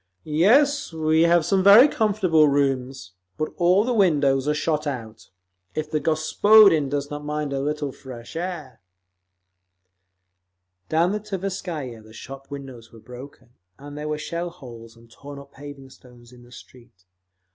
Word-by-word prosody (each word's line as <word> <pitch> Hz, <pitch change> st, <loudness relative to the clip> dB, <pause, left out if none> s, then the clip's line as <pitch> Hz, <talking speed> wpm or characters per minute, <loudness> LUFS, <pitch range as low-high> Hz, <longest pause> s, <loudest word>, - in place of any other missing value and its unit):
"Yes, 270 Hz, -, +2 dB
we 160 Hz, 0 st, +1 dB
have 170 Hz, -2 st, +3 dB
some 195 Hz, -1 st, +1 dB
very 210 Hz, +8 st, +8 dB
comfortable 195 Hz, -, +2 dB
rooms, 135 Hz, -6 st, -2 dB, 0.3 s
but 155 Hz, 0 st, -4 dB
all 180 Hz, +3 st, +3 dB
the 250 Hz, +2 st, -1 dB
windows 145 Hz, -, +2 dB
are 150 Hz, -, +2 dB
shot 150 Hz, 0 st, -2 dB
out. 115 Hz, -5 st, -7 dB, 0.5 s
If 155 Hz, 0 st, -4 dB
the 155 Hz, -, 0 dB
gospodin 160 Hz, +1 st, +4 dB
does 145 Hz, 0 st, -4 dB
not 145 Hz, 0 st, -6 dB
mind 150 Hz, -1 st, -4 dB
a 135 Hz, -, -2 dB
little 145 Hz, 0 st, -3 dB
fresh 125 Hz, 0 st, -12 dB
air…." 165 Hz, -6 st, -6 dB, 2.1 s
Down 165 Hz, +3 st, +1 dB
the 210 Hz, -, -2 dB
Tverskaya 180 Hz, -, -6 dB
the 110 Hz, 0 st, -17 dB
shop 135 Hz, +4 st, -11 dB
windows 130 Hz, -5 st, -10 dB
were 115 Hz, -, -15 dB
broken, 125 Hz, +2 st, -13 dB, 0.3 s
and 145 Hz, +1 st, -11 dB
there 150 Hz, +1 st, -6 dB
were 150 Hz, -, -2 dB
shell 170 Hz, +3 st, -5 dB
holes 120 Hz, -9 st, -13 dB
and 115 Hz, 0 st, -20 dB
torn 140 Hz, +4 st, -12 dB
up 140 Hz, 0 st, -13 dB
paving 140 Hz, -1 st, -12 dB
stones 120 Hz, -2 st, -18 dB
in 125 Hz, -1 st, -17 dB
the 120 Hz, 0 st, -19 dB
street. 120 Hz, -6 st, -17 dB
145 Hz, 155 wpm, -23 LUFS, 130-170 Hz, 2.1 s, very